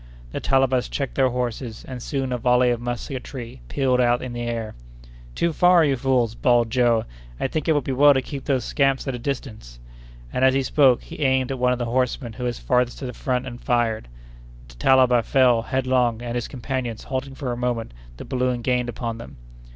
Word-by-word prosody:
The -, -, -3 dB
Talabas 135 Hz, -2 st, +2 dB
checked 140 Hz, -3 st, -3 dB
their 135 Hz, -2 st, +3 dB
horses, 120 Hz, -2 st, -4 dB
and 130 Hz, -2 st, -7 dB
soon 135 Hz, 0 st, -3 dB
a 125 Hz, -, -1 dB
volley 125 Hz, +1 st, +3 dB
of 120 Hz, -1 st, -2 dB
musketry 120 Hz, -, -6 dB
pealed 130 Hz, -, +1 dB
out 120 Hz, 0 st, +2 dB
on 125 Hz, -, -6 dB
the 120 Hz, -, -4 dB
air. 115 Hz, -2 st, -3 dB, 0.6 s
"Too 170 Hz, -1 st, 0 dB
far, 175 Hz, 0 st, +5 dB
you 140 Hz, -2 st, +2 dB
fools!" 125 Hz, -3 st, +1 dB
bawled 120 Hz, -2 st, +2 dB
Joe. 120 Hz, -3 st, +2 dB, 0.3 s
"I -, -, -1 dB
think 155 Hz, +4 st, -3 dB
it 160 Hz, -, +4 dB
would 145 Hz, -2 st, +1 dB
be 135 Hz, -, -3 dB
well 145 Hz, +2 st, +6 dB
to 130 Hz, -, +2 dB
keep 140 Hz, -1 st, -7 dB
those 130 Hz, -5 st, 0 dB
scamps 135 Hz, -1 st, +1 dB
at 135 Hz, -, -1 dB
a 125 Hz, -, -5 dB
distance." 115 Hz, -, -5 dB, 0.6 s
And, 130 Hz, -, 0 dB
as 130 Hz, 0 st, +5 dB
he 135 Hz, -, +2 dB
spoke, 130 Hz, -2 st, +3 dB
he -, -, -10 dB
aimed 130 Hz, -2 st, +1 dB
at 135 Hz, -, -4 dB
one 125 Hz, 0 st, +3 dB
of 125 Hz, -, 0 dB
the 120 Hz, -, -2 dB
horsemen 125 Hz, 0 st, -1 dB
who 125 Hz, +2 st, -5 dB
was 120 Hz, -1 st, -2 dB
farthest 125 Hz, -1 st, 0 dB
to -, -, -6 dB
the 125 Hz, -, -5 dB
front, 125 Hz, +1 st, -2 dB
and 125 Hz, -1 st, -8 dB
fired. 120 Hz, -, 0 dB, 0.6 s
The -, -, -13 dB
Talaba 125 Hz, -, +4 dB
fell 125 Hz, -2 st, +3 dB
headlong, 125 Hz, -2 st, 0 dB
and, 120 Hz, -1 st, -4 dB
his 120 Hz, -1 st, -2 dB
companions 125 Hz, -3 st, -4 dB
halting 135 Hz, 0 st, -4 dB
for 135 Hz, -3 st, -4 dB
a -, -, -2 dB
moment, 120 Hz, -2 st, -2 dB, 0.3 s
the -, -, -8 dB
balloon 125 Hz, -2 st, -1 dB
gained 125 Hz, -1 st, 0 dB
upon 115 Hz, -1 st, -4 dB
them. 115 Hz, -, -11 dB
125 Hz, 215 wpm, -23 LUFS, 120-135 Hz, 0.6 s, well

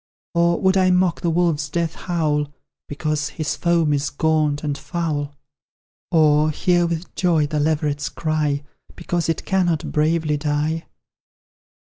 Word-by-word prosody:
Or, 170 Hz, 0 st, +2 dB
would 190 Hz, 0 st, +3 dB
I 185 Hz, -1 st, +4 dB
mock 180 Hz, -1 st, +2 dB
the 170 Hz, -, 0 dB
wolf's 165 Hz, -3 st, +1 dB
death 165 Hz, +1 st, -1 dB
howl, 150 Hz, -5 st, -1 dB, 0.4 s
Because 150 Hz, 0 st, -2 dB
his 155 Hz, +1 st, -3 dB
form 170 Hz, -3 st, +2 dB
is 140 Hz, 0 st, 0 dB
gaunt 150 Hz, -1 st, +1 dB
and 145 Hz, -2 st, -1 dB
foul? 145 Hz, -3 st, -3 dB, 0.7 s
Or, 155 Hz, -2 st, +4 dB
hear 175 Hz, +2 st, +2 dB
with 170 Hz, +1 st, -4 dB
joy 165 Hz, -4 st, +2 dB
the 150 Hz, +1 st, -2 dB
leveret's 150 Hz, -1 st, 0 dB
cry, 150 Hz, -3 st, -1 dB, 0.3 s
Because 175 Hz, -1 st, -2 dB
it 165 Hz, -, -2 dB
cannot 175 Hz, -5 st, 0 dB
bravely 155 Hz, 0 st, +1 dB
die? 150 Hz, +2 st, -1 dB
155 Hz, 135 wpm, -21 LUFS, 150-170 Hz, 0.7 s, I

